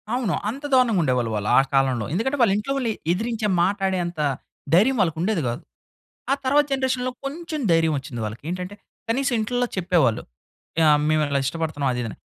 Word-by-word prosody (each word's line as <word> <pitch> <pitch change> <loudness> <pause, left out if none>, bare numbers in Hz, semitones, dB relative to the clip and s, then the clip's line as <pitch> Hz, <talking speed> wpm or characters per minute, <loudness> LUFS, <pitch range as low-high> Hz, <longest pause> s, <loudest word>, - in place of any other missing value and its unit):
అవును. 235 -8 0 0.2
అంత 275 +5 -6
దారుణంగుండేవాళ్ళు 160 - +2
వాళ్ళు 105 0 -2
ఆ - - +7
కాలంలో. 130 -4 +2
ఎందుకంటే 265 +9 0
వాళ్ళింట్లో 215 +5 +2
వాళ్ళని 235 -5 0 0.2
ఎదిరించే 225 +1 -2 0.2
మాట్లాడేంత, 190 -4 -1 0.6
ధైర్యం 240 +7 +4
వాళ్ళకుండేది 170 +2 0
గాదు. 120 - -3 0.7
ఆ - - +6
తర్వాత 290 +2 +4
జనరేషన్‌లో 260 -1 0
కొంచెం 315 +2 -5
ధైర్యమోచ్చింది 145 -7 0
వాళ్ళకి. 110 +5 -7
ఏంటంటే 180 +2 -5 0.3
కనీసం 260 +2 +1
ఇంట్లల్లో 245 +3 0
చెప్పేవాళ్ళు. 170 - +2 0.6
ఆహ్, 150 -1 +5
మేమిలా 150 -3 +1
ఇష్టపడుతున్నాం 145 -2 -1
అది 125 - -2
ఇదని. 110 - -6
185 Hz, 140 wpm, -23 LUFS, 150-245 Hz, 0.7 s, ఆ